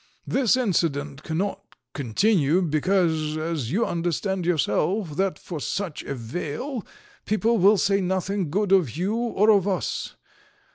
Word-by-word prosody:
"This 255 -2 +2
incident 150 - 0
cannot 175 +6 -2 0.3
continue, 160 - +2
because, 160 -1 +1
as 155 -6 -3
you 220 +7 +2
understand 175 +2 -2
yourself 165 - 0
that 190 -2 0
for 170 -4 -7
such 170 - -3
a 140 - -5
vale, 165 - -4 0.4
people 220 +2 +2
will 200 +3 +6
say 195 +1 +2
nothing 185 -1 -1
good 200 +4 0
of 170 - +3
you 190 +5 0
or 225 -2 +3
of 200 -2 +3
us. 190 -3 -2
180 Hz, 135 wpm, -24 LUFS, 155-200 Hz, 0.4 s, will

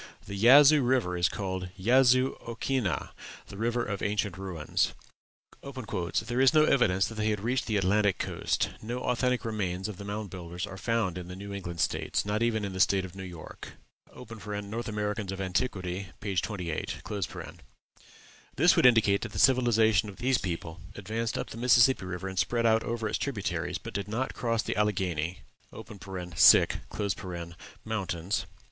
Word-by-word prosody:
The 100 - -7
Yazoo 140 +8 +7
River 120 -8 +1
is 90 0 +2
called 95 -2 -4
Yazoo 130 +5 +4
okhinnah 115 -3 -2 0.4
the - - -9
River 120 +3 -1
of 100 -2 -4
Ancient 105 -2 -1
Ruins. 95 -5 -2 0.7
"There 120 -2 -3
is 135 +3 +5
no 155 - +7
evidence 95 -11 +3
that 115 - -6
they 110 0 -1
had 105 -2 -1
reached 125 +4 -1
the 110 -3 +1
Atlantic 100 +1 +2
coast; - - -1
no 120 +3 -4
authentic 125 0 0
remains 95 -4 -2
of 105 -4 -7
the 100 - -8
Mound 105 0 -5
Builders 90 0 -5
are 100 -1 -9
found 110 -7 -1
in 90 - -8
the 90 - -7
New 100 +1 -7
England 85 -4 -5
States, - - 0
nor 105 +2 -1
even 110 -3 +1
in 100 - -5
the 95 - -5
State 95 0 +3
of 90 - -10
New 95 - -7
York." 90 -4 -9 0.4
("North 105 +1 -6
Americans 105 -2 -2
of 95 - -6
Antiquity," 95 -1 -2
p. 100 -2 -4
28.) 90 -4 -3 1.5
This 170 +6 +5
would - - +6
indicate 110 -5 +4
that - - -6
the - - -5
civilization 115 -5 +4
of 100 - -10
this 130 +1 +1
people 85 -2 -5
advanced 110 +3 -3
up - - -4
the - - -8
Mississippi 120 -2 +4
River 90 +1 -5
and 95 -1 -3
spread 120 -1 +1
out 110 0 +4
over 115 -1 -2
its 110 - -2
tributaries, 100 - -2
but - - -9
did 100 0 -3
not 120 +5 -2
cross 115 -1 -1
the - - -3
Alleghany 90 -7 -1 2.4
Mountains. 95 -3 -2
105 Hz, 165 wpm, -29 LUFS, 95-115 Hz, 2.4 s, Yazoo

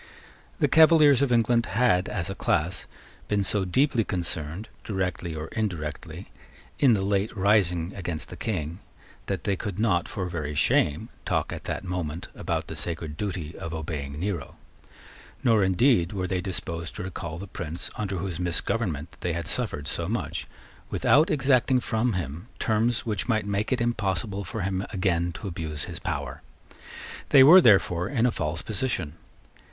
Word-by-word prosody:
The - - +3
Cavaliers 155 -4 +6
of 140 -3 +2
England 115 0 +3
had, 95 -7 +3
as 85 - -2
a 95 - -3
class, 90 0 -1 0.4
been 105 -1 +1
so 95 0 +1
deeply 125 +5 +2
concerned, 85 0 -2 0.2
directly 90 -4 -2
or 80 +1 -5
indirectly, 85 -9 -4 0.5
in 130 -5 +6
the 95 - -1
late 100 +3 0
rising 95 -3 +2
against 85 -5 -5
the - - -8
King, 85 -5 -3 0.5
that 95 -5 -2
they 100 - +1
could 100 -1 -5
not, 105 -6 +1
for 95 - -3
very 75 -4 -4
shame, 70 0 +2
talk - - -1
at - - -8
that - - -3
moment 90 -3 -4
about - - -2
the - - -7
sacred 80 -3 -2
duty 85 -4 -4
of 85 0 -5
obeying 75 -3 -5
Nero; 90 -6 -3 0.9
nor, 110 -4 +4
indeed, 95 -1 +3
were 95 -2 -2
they 90 0 -1
disposed 85 -2 -4
to - - -5
recall 85 -3 -5
the 95 - -6
prince 85 -3 -4
under 100 -2 -3
whose 90 -1 -4
misgovernment 85 -2 -1
they 85 - -2
had 85 0 -3
suffered 80 -10 -2
so - - -2
much, - - -3 0.4
without 150 +3 +4
exacting 130 -2 +3
from 115 0 0
him 85 - -4
terms 110 +1 +1
which 105 0 -2
might 110 -3 +1
make 100 +3 -1
it 130 - +2
impossible 100 -4 -1
for 105 +4 -5
him 95 0 -1
again 90 -4 0
to 100 - -7
abuse 80 -4 -4
his - - -6
power. - - -4 0.9
They 135 - +8
were, 175 +7 +10
therefore, 95 - +4
in 120 -2 +1
a 125 - +3
false 75 -3 -2
position. 105 - -1
95 Hz, 165 wpm, -26 LUFS, 85-110 Hz, 0.9 s, were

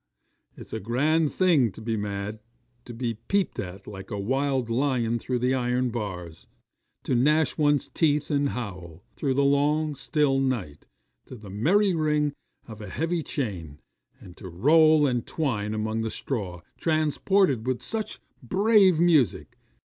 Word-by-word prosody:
It's - - -11
a - - -2
grand 145 +8 +1
thing 160 - +3
to - - -12
be 110 0 -2
mad! 105 0 -4 0.5
to 120 - -9
be 115 -2 -3
peeped 200 -1 0
at 95 +1 -6
like 95 -2 -9
a 105 - -4
wild 130 +4 0
lion 120 -1 0
through 125 +1 -2
the 125 +2 +1
iron 125 -1 0
bars 90 -8 -6 0.6
to - - -1
gnash 150 +5 +2
one's 145 -2 +2
teeth 150 -2 0
and 140 -1 +1
howl, 90 -8 -7
through 135 -3 -1
the 140 - +2
long 145 +2 +2
still 140 0 +1
night, 120 - -3 0.4
to - - -9
the 105 -4 -11
merry 185 - +2
ring 150 -2 +1 0.3
of 110 -2 -10
a 105 - -7
heavy 165 - -1
chain 90 - -5 0.4
and 90 - -13
to 95 - -9
roll 155 - +5
and 125 -4 -1
twine 110 -9 -2
among 110 +1 -2
the 115 - -2
straw, 100 -9 -4 0.2
transported 155 - +1
with 130 -1 -1
such 220 -1 -4 0.2
brave 190 - +4
music. 160 - +2
130 Hz, 155 wpm, -26 LUFS, 105-150 Hz, 0.6 s, roll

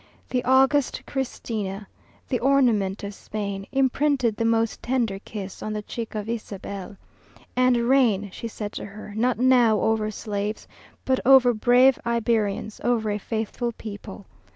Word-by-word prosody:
The 250 -1 0
august 270 +2 +3
Christina, 215 -7 -4 0.4
The 250 - -1
ornament 230 -8 +2
of 200 0 -5
Spain, 200 -1 -5
Imprinted 270 -3 +2
the 230 - -1
most 230 0 +1
tender 235 -6 -1
kiss 200 -2 -8
On 215 - -3
the 210 0 -4
cheek 225 +1 -6
of 210 0 -3
Isabel. 200 -3 -6 0.6
And 255 -1 +4
"Reign," 225 -7 +3
she 230 - -5
said 210 -2 -6
to - - -6
her, 210 +1 -10
"Not 240 +4 +1
now 245 -3 +4
over 220 -1 +1
slaves, 210 0 -4 0.4
But 260 -1 +2
over 255 -2 +6
brave 245 +3 +4
Iberians, 225 -3 -1
Over 225 -3 +1
a 205 - -2
faithful 225 +3 -3
people!" 205 -2 -9
225 Hz, 145 wpm, -24 LUFS, 205-250 Hz, 0.6 s, over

